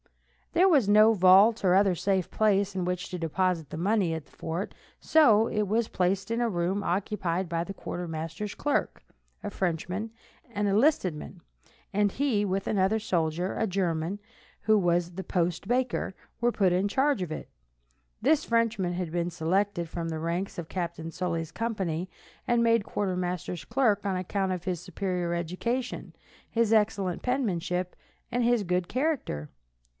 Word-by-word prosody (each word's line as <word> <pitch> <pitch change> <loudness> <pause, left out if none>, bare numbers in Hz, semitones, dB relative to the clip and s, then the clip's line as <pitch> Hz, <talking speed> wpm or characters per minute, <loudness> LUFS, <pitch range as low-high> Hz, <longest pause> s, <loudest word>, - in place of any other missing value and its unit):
There 365 +3 +5
was 280 - +4
no 215 +2 +7
vault 195 +4 +6
or 185 -1 +4
other 195 -1 +4
safe 190 +1 0
place 200 -2 +2
in 185 -2 -1
which 180 0 -3
to 180 - -5
deposit 165 -1 0
the - - -6
money 190 -1 +1
at 160 -2 -6
the - - -25
fort, 165 +4 -4 0.3
so 225 -9 +5
it 215 - -1
was 220 +3 +1
placed 190 +3 0
in 230 +1 0
a 235 - +2
room 185 +1 -1
occupied 185 -1 -1
by 165 0 -1
the 195 - -7
quartermaster's 170 +2 -5
clerk, 290 - -1 0.4
a 205 - -3
Frenchman, 185 +4 -2 0.4
an 205 0 0
enlisted 205 - +3
man, 170 +4 -9 0.5
and 205 0 +2
he, 255 -7 +1
with 195 -1 -1
another 200 +2 +2
soldier, 175 -3 -1
a - - 0
German, 180 -1 -1 0.4
who 215 0 +4
was 175 -2 +1
the 190 +2 -6
post 175 0 -1
baker, 245 -5 0 0.3
were 240 0 +3
put 190 -5 +2
in 185 +3 +2
charge 270 +2 +1
of 175 -3 -3
it. - - -5 0.7
This 300 +5 +3
Frenchman 230 -6 +1
had 175 -2 -3
been 175 0 -1
selected 175 +2 0
from 165 0 -4
the 160 -1 -3
ranks 170 +4 -3
of 170 -2 -5
Captain 170 -2 -4
Sully's 170 -2 -3
company 190 -7 -2 0.4
and 240 -1 +3
made 230 -2 +3
quartermaster's 180 -4 -3
clerk 225 -5 +2
on 190 -2 0
account 190 +1 -1
of 180 -2 -3
his 180 -3 -2
superior 180 -1 -2
education, 210 +9 -3 0.4
his 230 -1 +2
excellent 200 -5 +1
penmanship 185 -8 -1 0.4
and 245 0 +1
his 235 -2 +3
good 180 -1 0
character. 255 - -1
190 Hz, 160 wpm, -28 LUFS, 175-215 Hz, 0.7 s, no